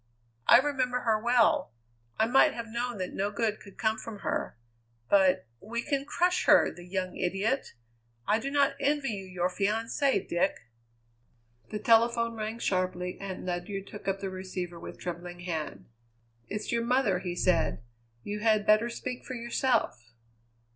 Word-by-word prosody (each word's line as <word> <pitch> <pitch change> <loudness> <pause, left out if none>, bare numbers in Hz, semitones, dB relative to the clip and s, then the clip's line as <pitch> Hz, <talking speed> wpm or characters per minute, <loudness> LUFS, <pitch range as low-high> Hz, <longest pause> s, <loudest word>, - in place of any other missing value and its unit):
I 235 - +10
remember 255 -2 0
her 220 -2 +1
well. 235 - +3 0.4
I 220 - +4
might 270 +5 +4
have 235 - -4
known 240 0 -3
that 185 -1 -4
no 200 +1 0
good 215 0 -1
could 200 - -14
come 220 0 0
from 215 -3 -8
her. - - -2 0.5
But 190 -7 +4
we 235 +3 -4
can 280 -2 -1
crush 360 +4 +1
her, - - +6
the 175 - -12
young 185 0 -3
idiot! 195 - -1 0.5
I 215 - +3
do 275 - -3
not 280 -1 +3
envy 285 -1 +1
you 200 -3 -4
your 180 -1 -1
fiancée, 215 +5 0
Dick." 175 +3 +1 1.1
The 215 - -3
telephone 230 +1 +3
rang 220 0 -4
sharply 185 -4 -1
and 190 -2 -6
Ledyard 185 +2 -3
took 205 -1 -10
up 195 0 -1
the 195 -1 -3
receiver 185 -2 -5
with - - -9
trembling 175 0 -6
hand. 155 - -4 0.6
"It's 210 +1 -4
your 235 0 +1
mother," 235 -6 +2
he 180 -1 -4
said; 170 -10 +1 0.4
"you 205 +1 -4
had 215 -1 +3
better 215 +3 +4
speak 250 +1 -5
for 255 - -6
yourself." 235 - -1
215 Hz, 160 wpm, -29 LUFS, 185-235 Hz, 1.1 s, I